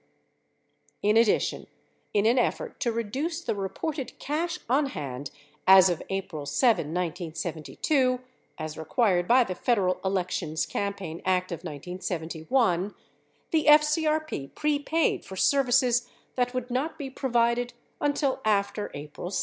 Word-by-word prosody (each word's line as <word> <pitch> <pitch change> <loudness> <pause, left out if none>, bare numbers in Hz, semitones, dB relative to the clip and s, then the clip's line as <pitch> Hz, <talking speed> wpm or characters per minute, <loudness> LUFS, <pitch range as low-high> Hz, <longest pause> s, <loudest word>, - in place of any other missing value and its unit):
In 210 +1 +3
addition, 230 -1 +2 0.4
in 205 0 +2
an 240 +3 +4
effort - - -1
to 235 - 0
reduce 265 +10 -2
the 350 - -2
reported 245 +9 -4
cash 335 +5 -2
on 275 +4 +2
hand 140 - -5 0.4
as 190 -1 +8
of 170 - -3
April 170 -7 -4
7, 225 - +3
1972, 175 - -1 0.4
as 155 0 -6
required 180 - +1
by 250 +1 +6
the 190 - -4
Federal 185 -2 +1
Elections 180 -4 -1
Campaign 195 -5 -4
Act 185 0 +1
of 170 - -2
1971, 175 - -2 0.6
the 315 -2 +2
FCRP 305 - +3
prepaid 300 +2 +1
for 190 - -9
services 250 +1 +3 0.2
that 245 -1 0
would 250 0 -3
not 270 +6 -1
be 275 -3 -6
provided 240 -2 +1 0.3
until 285 -2 0
after 205 0 0
April 150 +4 -7
7. 195 - -1
215 Hz, 125 wpm, -27 LUFS, 180-265 Hz, 0.6 s, as